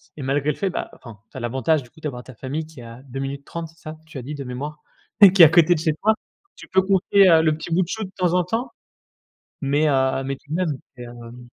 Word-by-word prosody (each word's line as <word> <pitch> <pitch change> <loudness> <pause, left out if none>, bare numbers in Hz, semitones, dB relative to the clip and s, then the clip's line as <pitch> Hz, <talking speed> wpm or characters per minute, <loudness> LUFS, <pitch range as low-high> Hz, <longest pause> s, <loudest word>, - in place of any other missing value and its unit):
et 150 - -8
malgré 140 +3 0
le - - -6
fait, 195 - -1
bah - - -5
enfin, 115 -4 -13
tu - - -10
as - - -4
l'avantage, 130 +5 0
du 125 - -16
coup, 160 - -20
d'avoir 125 -5 -5
ta 130 - -13
famille 145 +7 -5
qui 155 -6 -13
est - - -10
à 115 +2 -11
2 135 0 -7
minutes 140 +1 -5
30, 170 -1 -6
c'est 165 +1 -23
ça? 155 0 -9
Tu 155 -4 -9
as - - -6
dit 145 +5 -6
de 140 - -6
mémoire, 140 +4 -6 0.5
qui 195 - +5
est 165 - +13
à - - +7
côté 170 +1 +5
de 155 - -2
chez 160 -1 +1
toi. 220 - +5 0.4
Tu - - -13
peux 190 0 +3
confier, 195 0 +4
heu, 160 -1 +6
le 155 -1 +2
petit 165 +1 -5
bout 185 - +3
de 170 - -1
chou, 220 +3 -4
de 190 - -7
temps 180 -2 +1
en 180 - +3
temps? 225 +8 -3 0.9
Mais 145 +2 +1
heu, 130 0 +1
mais 135 +1 -3
tout 140 - -25
de 155 - -2
même, 160 -7 -1 0.2
c'est 125 - -9
hem 120 0 -11
150 Hz, 285 wpm, -22 LUFS, 130-170 Hz, 0.9 s, est